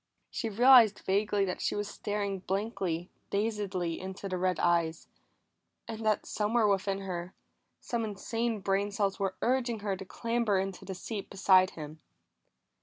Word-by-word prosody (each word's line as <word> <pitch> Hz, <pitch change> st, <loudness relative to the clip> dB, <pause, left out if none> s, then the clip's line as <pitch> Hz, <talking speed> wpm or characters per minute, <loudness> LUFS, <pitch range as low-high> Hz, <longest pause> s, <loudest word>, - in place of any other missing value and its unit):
She 225 Hz, -, -2 dB
realized 235 Hz, -1 st, +7 dB
vaguely 200 Hz, +1 st, +2 dB
that 180 Hz, -, -4 dB
she -, -, 0 dB
was 205 Hz, 0 st, -2 dB
staring 205 Hz, -2 st, -3 dB
blankly, 190 Hz, -3 st, -2 dB, 0.2 s
dazedly, 200 Hz, -5 st, -1 dB
into 190 Hz, +1 st, -6 dB
the 185 Hz, -1 st, -3 dB
red 185 Hz, 0 st, +1 dB
eyes, 170 Hz, -2 st, +1 dB, 0.8 s
and 225 Hz, -1 st, -6 dB
that 215 Hz, -1 st, +1 dB
somewhere 220 Hz, +2 st, +1 dB
within 195 Hz, 0 st, 0 dB
her, 180 Hz, -1 st, -5 dB, 0.5 s
some 235 Hz, -2 st, -2 dB
insane 220 Hz, +2 st, -2 dB
brain 195 Hz, +1 st, +1 dB
cells 200 Hz, -1 st, -1 dB
were 195 Hz, -1 st, -1 dB
urging 240 Hz, -3 st, +1 dB
her 200 Hz, -2 st, -1 dB
to 190 Hz, -, -8 dB
clamber 210 Hz, -2 st, 0 dB
to 195 Hz, -, -13 dB
the 190 Hz, 0 st, -5 dB
seat 200 Hz, +2 st, -6 dB
beside 190 Hz, -1 st, +4 dB
him. 155 Hz, 0 st, -8 dB
200 Hz, 150 wpm, -30 LUFS, 185-215 Hz, 0.8 s, realized